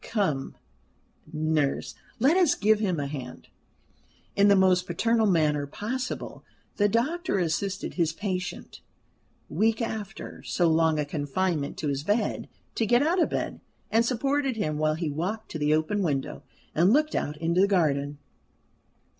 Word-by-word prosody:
Come, 160 - -1 0.8
nurse, 155 -2 0 0.2
let 270 +8 +4
us 360 -5 +4
give 215 +1 +3
him 185 -7 0
a 145 - -2
hand." 135 -3 -7 0.9
In 200 0 +5
the 200 - +6
most 185 -1 +3
paternal 230 -1 +2
manner 150 -5 +2
possible 240 - -5 0.3
the 205 0 +3
doctor 270 - 0
assisted 185 +3 -2
his 165 -3 +1
patient, 180 0 -5 0.7
weak, 220 +8 +1
after 220 -3 -5
so 175 - 0
long 160 -1 +3
a 150 - 0
confinement 145 +1 -2
to 150 - -3
his 140 0 -1
bed, 205 +5 -1 0.2
to 225 - 0
get 240 +5 +4
out 345 +4 +2
of - - +2
bed, - - -3 0.3
and 225 +1 +4
supported 270 +2 0
him 155 -8 -2
while 155 0 +2
he 160 -2 -2
walked 185 +9 -4
to 160 - -4
the 150 +1 +3
open 160 +7 0
window, 135 - -2 0.3
and 175 +5 +4
looked 305 +4 +3
out 150 +1 -2
into 170 +3 +1
the 200 - +5
garden. 145 -7 +1
185 Hz, 155 wpm, -27 LUFS, 155-220 Hz, 0.9 s, the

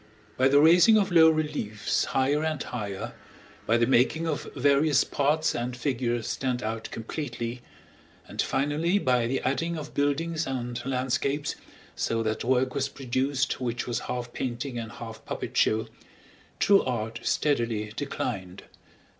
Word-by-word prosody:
By 130 - +4
the 140 +1 +5
raising 175 +8 +7
of 200 -2 +1
low 160 -2 +7
reliefs 150 -10 -1
higher 140 +3 +1
and 155 -2 -1
higher, 100 -5 -5 0.5
by 115 - +4
the 120 - +3
making 135 +6 +3
of 145 -5 -3
various 140 +1 +4
parts 150 +3 +1
and 120 +1 -3
figures 120 -2 -1
stand 125 -2 -2
out 110 +1 -3
completely, 120 -1 -5 0.7
and - - -2
finally 150 +7 +1
by 125 -9 +2
the 130 +2 -1
adding 165 +5 -1
of 150 -1 -7
buildings 155 +3 0
and 125 -2 -3
landscapes, 135 +3 -1 0.4
so 115 0 -1
that 110 0 -2
work 130 +1 +1
was 140 -1 -1
produced 130 0 -1
which 120 -1 -2
was 120 -2 -1
half 120 -1 -4
painting 125 0 -3
and 110 -2 -6
half 115 -1 -9
puppet - - -5
show, 110 +1 +2 0.7
true 200 -1 +5
art 115 -2 -3
steadily 115 -7 0
declined. 100 -9 -4
130 Hz, 145 wpm, -27 LUFS, 120-145 Hz, 0.7 s, raising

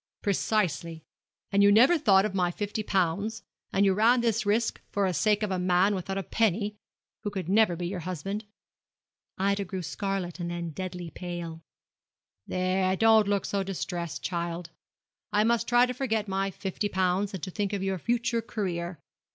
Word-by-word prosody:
'Precisely! 175 -6 0 0.5
and 200 0 +4
you 200 0 +7
never 250 +11 +6
thought 205 - +4
of 210 - -2
my 180 -2 +2
fifty 205 +4 -3
pounds, 195 +2 0 0.3
and 195 +1 +3
you 195 - +4
ran 230 +5 +4
this 230 -2 0
risk 225 +3 +1
for 200 -1 +1
the 185 - 0
sake 210 +6 +2
of 210 - -1
a 185 -1 -1
young 180 - -2
man 185 +3 +4
without 195 0 -3
a 195 - -2
penny, 210 0 0 0.5
who 205 - -3
never 200 +1 +4
could - - -5
be 175 0 -3
your 185 0 -4
husband.' 185 +5 -4 0.9
Ida 200 +1 +1
grew 185 -1 -5
scarlet 195 0 -3
and 170 -1 -3
then 170 -1 -4
deadly 180 0 -6
pale. 175 -2 -6 0.9
'There, 185 +1 +1
don't 220 -1 +5
look 200 -1 +1
so 200 - -1
distressed, 175 -3 -4
child. 170 -1 -3 0.6
I 210 - +3
must 235 +1 +2
try 240 0 +5
to 250 - -3
forget 225 -5 -1
my 195 0 0
fifty 195 +2 -3
pounds, 190 +1 0
and 175 - -8
to 185 - -4
think 200 +1 -2
of 200 -2 -2
your 190 -1 -1
future 235 +2 0
career. 180 -6 -3
195 Hz, 180 wpm, -28 LUFS, 180-210 Hz, 0.9 s, you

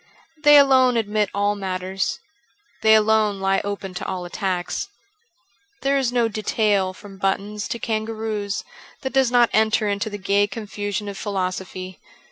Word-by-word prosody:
They 295 -1 +8
alone 260 -3 +5
admit 210 -2 0
all 205 +1 +1
matters: 190 -1 -3 0.6
they 220 0 +6
alone 215 -2 +3
lie 195 0 +1
open 200 -2 -5
to 180 - -5
all 185 -1 -4
attacks.... 185 - -3 1.0
There 275 +1 +2
is 265 -3 +1
no 240 -2 +2
detail 210 -3 +1
from 195 0 -13
buttons 205 +2 -1
to - - -3
kangaroos 220 -2 -3 0.4
that 265 - -3
does 265 -2 +3
not 240 -1 +4
enter 220 0 +3
into 200 +1 -1
the 205 - -6
gay 200 +1 +2
confusion 205 -1 -4
of 200 -1 -6
philo 190 -3 -1
sophy. 185 0 -8
205 Hz, 150 wpm, -22 LUFS, 195-220 Hz, 1.0 s, They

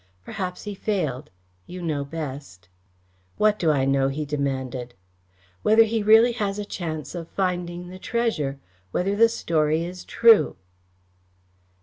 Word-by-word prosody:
Perhaps 180 -2 -5
he 210 - -5
failed. 155 - -2 0.4
You 180 - -8
know 155 -5 -2
best." 140 - -7 0.7
"What 210 -1 +3
do 165 - +2
I 140 -3 +2
know?" 135 0 +2
he 145 +3 -3
demanded. 130 -4 -3 0.7
"Whether 220 +1 +6
he 225 0 -1
really 220 +3 +6
has 205 -4 -2
a 205 - -4
chance 160 -6 -5
of 170 -2 -6
finding 180 -2 -3
the 185 +1 -10
treasure 205 - -1 0.3
whether 190 - 0
the 230 +2 +5
story 160 -6 0
is 180 +1 -8
true." 230 -2 +5
175 Hz, 135 wpm, -24 LUFS, 145-205 Hz, 0.7 s, Whether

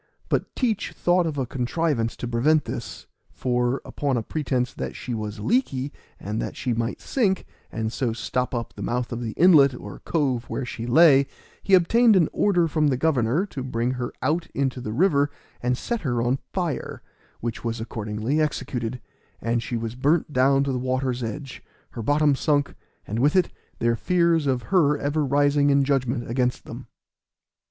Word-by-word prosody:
But - - -1
Teach 225 -6 -1
thought 175 -1 +2
of 155 -2 -4
a 135 - 0
contrivance 125 -1 -1
to 120 - -5
prevent 140 +6 +2
this, - - -6 0.2
for, 125 +1 -1
upon 140 -3 -1
a 115 - -1
pretence 130 -2 -1
that - - -5
she 125 - -5
was 105 -1 -4
leaky, 145 - 0 0.3
and 105 +3 -3
that - - -4
she 125 - -1
might 115 0 -2
sink, 200 -8 0 0.3
and 110 0 -3
so 125 -4 0
stop 125 +2 -2
up 115 -1 -4
the - - -10
mouth 120 0 -2
of 120 0 -4
the 115 -2 -4
inlet 150 -7 +6
or 105 -4 -9
cove 130 -7 -1
where 130 - -4
she 120 -1 -6
lay, 140 0 +6 0.3
he 195 - +5
obtained 220 +6 +5
an 170 -5 +4
order 175 -5 +2
from 155 -1 +1
the 135 -3 +1
governor 140 - +1
to 145 -9 -7
bring 125 -1 -1
her 125 -1 -3
out 165 +3 0
into 135 -2 -1
the 110 - -4
river 145 - +3 0.3
and 125 0 0
set 235 - -3
her 125 -6 -1
on 120 +3 +1
fire, 175 -6 -3 0.4
which 120 -1 -4
was 115 0 -2
accordingly 110 +5 -2
executed, 125 -5 -2 0.4
and 115 +1 0
she 120 +1 -3
was 115 0 -4
burnt 145 +4 +1
down 135 +2 +4
to 140 - -1
the 125 - -1
water's 130 0 -1
edge, 130 +4 -6 0.3
her 115 - -6
bottom 145 +5 +3
sunk, 145 0 +1 0.3
and 110 +3 -3
with 145 +6 +3
it 185 - +3 0.3
their 115 0 +1
fears 170 +2 +2
of 130 -2 0
her 150 -5 +4
ever 145 +2 0
rising 145 +1 +3
in 140 0 +4
judgment 130 -3 0
against 125 +1 -1
them. - - -9
135 Hz, 180 wpm, -24 LUFS, 120-155 Hz, 0.4 s, inlet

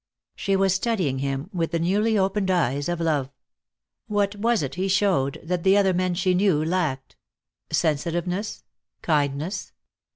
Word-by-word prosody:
She 195 -1 0
was 195 -1 +3
studying 185 - 0
him 135 +6 -3
with 165 -3 -1
the 170 - -1
newly 205 +6 +1
opened 195 0 +1
eyes 145 -5 +1
of 175 -1 -2
love. 150 -5 0 0.8
What 205 -1 0
was 225 -3 +1
it 135 - -4
he 185 +2 -1
showed 185 -8 +1
that 175 +1 -2
the 190 +3 +4
other 195 -2 +3
men 180 0 0
she 185 +1 +1
knew 180 -5 +2
lacked? 160 -7 -2 0.5
Sensitiveness? 175 +6 -1 0.4
Kindness? 150 +4 -1
180 Hz, 150 wpm, -24 LUFS, 155-195 Hz, 0.8 s, the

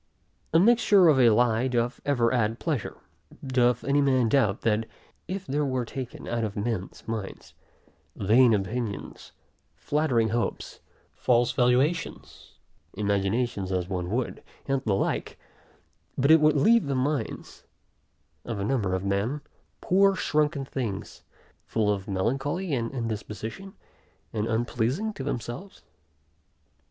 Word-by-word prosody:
A 165 - +5
mixture 205 -3 +5
of 140 -4 +4
a 120 -2 +7
lie 115 +2 +3
doth 120 0 -1
ever 120 -5 +2
add 115 -2 +1
pleasure. 150 -10 -3 0.5
Doth 125 -2 +2
any 140 +1 +2
man 130 -4 +2
doubt, 110 -6 +2
that 110 0 +1 0.4
if 190 +2 -4
there 145 0 -1
were 130 -3 -1
taken 125 +1 -7
out 115 -1 -1
of 105 -2 -3
men's 105 -2 -4
minds, 110 -4 -6 0.6
vain 115 +5 +4
opinions, 105 +1 -3 0.4
flattering 130 -7 +1
hopes, 120 +2 -3 0.3
false 120 -1 +2
valuations, 130 +7 -1 0.4
imaginations 100 0 -1
as 90 -1 -1
one 90 -2 -3
would, 120 +4 -2 0.3
and 135 -1 0
the 105 -3 +2
like, - - -2 0.8
but 140 +3 +3
it 160 -1 +7
would 155 0 +4
leave 220 +2 +4
the 140 - -1
minds, 140 +3 -3 0.8
of 115 -4 -5
a 100 - -2
number 105 -7 0
of 95 +1 -3
men, 100 +9 -1 0.4
poor 195 +1 +4
shrunken 150 -5 0
things, 115 -8 -5 0.5
full 105 -2 +1
of 95 -1 -6
melancholy 135 - -1
and 115 -3 -1
indisposition, 115 - -5 0.6
and 110 0 -1
unpleasing 120 - -1
to 180 - -6
themselves? 130 - -6
120 Hz, 130 wpm, -26 LUFS, 110-140 Hz, 0.8 s, a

